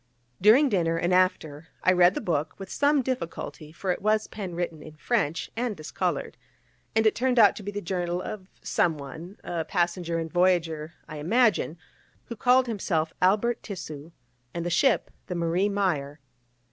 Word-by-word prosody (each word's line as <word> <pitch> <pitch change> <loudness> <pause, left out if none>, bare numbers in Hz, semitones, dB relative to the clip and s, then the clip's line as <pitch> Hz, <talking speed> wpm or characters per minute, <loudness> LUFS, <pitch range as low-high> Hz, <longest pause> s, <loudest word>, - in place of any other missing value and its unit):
During 230 +9 +7
dinner, 170 -8 +1
and 175 +2 +1
after, 160 -4 +1 0.2
I 185 - +5
read 180 +1 +5
the - - -2
book, 155 -3 -1
with 195 -1 -9
some 285 -1 +2
difficulty, 170 - -5
for 185 +3 -2
it 180 - -3
was 215 +1 +2
pen 190 -5 -6
written 170 -3 -3
in 155 0 -11
French, 165 -3 -1
and 230 -3 -2
discoloured, 155 - -3 0.6
and 220 0 +3
it 220 - +5
turned 255 0 0
out 210 -3 +7
to - - -6
be 205 - -5
the 205 0 -5
journal 175 -1 -2
of 185 0 -6 0.2
someone, 160 +3 -2
a 170 -2 -2
passenger 175 -1 -1
and 165 0 -4
voyager, 170 -3 +1
I 155 -2 -7
imagine, 200 0 +2 0.5
who 235 - -7
called 250 +3 +4
himself 175 -8 -1
Albert 210 +6 +2
Tissu, 160 -5 -8 0.4
and 170 0 -3
the 175 - -1
ship 225 - +2 0.2
the 180 - -4
Marie 170 +4 +1
Meyer. 160 -8 -1
180 Hz, 170 wpm, -26 LUFS, 165-210 Hz, 0.6 s, During